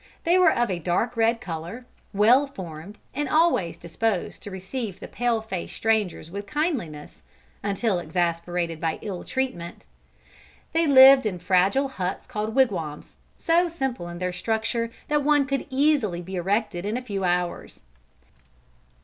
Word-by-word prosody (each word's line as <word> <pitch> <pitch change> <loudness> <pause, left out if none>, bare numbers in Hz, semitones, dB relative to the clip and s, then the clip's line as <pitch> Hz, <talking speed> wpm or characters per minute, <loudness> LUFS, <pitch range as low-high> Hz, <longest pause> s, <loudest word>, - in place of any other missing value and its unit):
They 350 +2 +4
were 365 - +6
of 240 -4 +1
a 175 - -2
dark 180 +8 0
red 230 0 +2
color, 170 +8 -6 0.3
well 235 +8 +5
formed 185 - -9 0.2
and 290 0 -2
always 310 - +2
disposed 185 +3 -2
to - - -8
receive 190 +1 -5
the - - -8
pale 240 -2 0
face 190 -6 -5
strangers 215 -7 0
with 200 +2 -6
kindliness, 260 - -3 0.4
until 200 -1 0
exasperated 170 0 -2
by 165 -1 -1
ill 195 -4 -5
treatment. 250 -11 -4 0.9
They 330 0 +2
lived 265 -3 +8
in 190 -4 -3
fragile 190 +9 +2
huts 190 -8 -4
called 215 +1 -4
wigwams, 175 - 0 0.2
so 340 +2 +3
simple 265 - -3
in 175 0 -7
their 180 0 -2
structure 230 +3 -1 0.2
that 295 0 +2
one 290 -1 +4
could 275 0 -2
easily 260 - +1
be 190 +2 -7
erected 195 0 -1
in 210 +4 -2
a - - -4
few 200 -5 -3
hours. 175 - -2
210 Hz, 150 wpm, -25 LUFS, 175-260 Hz, 0.9 s, lived